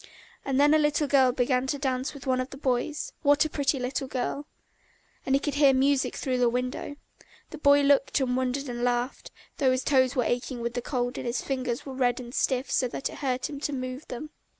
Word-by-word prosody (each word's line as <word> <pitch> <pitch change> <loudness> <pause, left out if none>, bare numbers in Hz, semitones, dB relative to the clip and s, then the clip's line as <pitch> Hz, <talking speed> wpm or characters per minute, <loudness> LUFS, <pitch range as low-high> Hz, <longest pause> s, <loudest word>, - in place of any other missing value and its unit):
And 270 -1 0
then 290 +1 +5
a 310 - +5
little 300 0 +2
girl 265 -2 +4
began 250 +1 +1
dancing 265 -1 -2
with 275 - -10
one 255 -1 +1
of 255 - -5
the 275 - -10
boys, 270 +2 -2
what 290 +1 +4
a - - -2
pretty 285 -1 0
little 255 +1 -3
girl! 265 +3 -3 0.8
And 270 - +3
he - - +3
could 290 0 -2
hear 285 -1 +5
the - - +2
music 275 0 +2
through 255 -2 -1
the 245 -1 +4
window. 250 +4 -3 0.6
The 310 - -8
boy 285 -1 +5
looked 280 +1 +3
and 255 -2 0
wondered 260 +2 -1
and 240 -1 -4
laughed, 245 +1 -1 0.3
though 270 - +3
his 255 0 0
toes 260 -1 +3
were 250 - +2
aching 245 +1 -2
with 235 0 -3
the 245 - -2
cold 245 -1 -2
and - - -5
his 235 -1 -2
fingers 255 -3 -3
were 270 - -6
red 250 -2 +1
and 245 -1 -9
stiff 260 0 0
so 255 - +2
that 255 - -4
it - - -10
hurt 255 -3 -1
him 285 -2 -7
to 290 0 -3
move 255 +2 -5
them. 300 +5 -7
260 Hz, 230 wpm, -27 LUFS, 250-280 Hz, 0.8 s, then